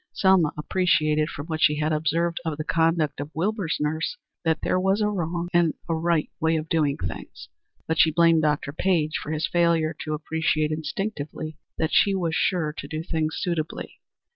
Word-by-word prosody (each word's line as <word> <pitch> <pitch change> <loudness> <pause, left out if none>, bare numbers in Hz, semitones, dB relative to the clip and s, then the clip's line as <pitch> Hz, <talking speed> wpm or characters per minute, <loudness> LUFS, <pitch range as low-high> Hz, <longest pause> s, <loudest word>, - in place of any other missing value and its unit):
Selma 190 -6 +4
appreciated 155 -2 +2
from 145 - -6
what 160 -1 -4
she 150 - +5
had 155 +1 0
observed 160 +3 0
of 160 -3 -3
the 155 - -3
conduct 160 -3 +1
of 145 +1 -4
Wilbur's 185 0 -1
nurse 155 - -1 0.3
that 160 -2 0
there 185 - +1
was 190 +2 +2
a 210 - +2
wrong 175 -2 -2
and 170 -2 +3
a 165 - 0
right 165 -1 0
way 160 0 +2
of 155 0 -4
doing 150 -4 +1
things, 85 -2 -7 0.4
but 160 -1 0
she 160 - +7
blamed 165 0 +4
Dr. 150 -2 0
Page 160 -3 +1
for - - -7
his 155 0 0
failure 170 -2 +2
to 155 0 -2
appreciate 155 0 0
instinctively 155 -1 -4 0.2
that 160 - -1
she 200 -1 +4
was 170 -4 -1
sure 160 -3 +1
to - - -6
do 155 0 -4
things 160 -2 -1
suitably. 165 -3 -3
160 Hz, 185 wpm, -25 LUFS, 155-170 Hz, 0.4 s, she